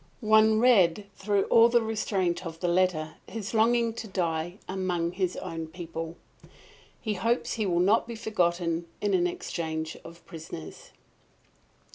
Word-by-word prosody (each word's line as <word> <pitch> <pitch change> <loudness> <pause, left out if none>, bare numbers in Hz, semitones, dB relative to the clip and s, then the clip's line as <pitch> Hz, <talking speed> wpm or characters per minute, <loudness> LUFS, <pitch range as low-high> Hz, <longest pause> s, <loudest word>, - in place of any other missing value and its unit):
One 220 0 +5
read 210 -6 +4
through 200 0 +1
all 230 0 +6
the 235 -1 +3
restraint 195 -5 -1
of 165 -2 -7
the 180 - -1
letter 170 -3 +1
his 220 -2 -6
longing 230 +1 +3
to 225 - -7
die 175 -2 -2
among 180 -3 -1
his 185 -1 -1
own 165 -3 -5
people. 165 0 -7 0.8
He 215 - -2
hopes 230 +5 0
he 215 -3 -1
will 175 -2 +1
not 210 +5 +3
be 235 - -6
forgotten 175 -6 0
in 205 -1 0
an 175 -1 +3
exchange 160 -2 -4
of 170 +1 -13
prisoners! 155 - -9
185 Hz, 145 wpm, -28 LUFS, 170-220 Hz, 0.8 s, all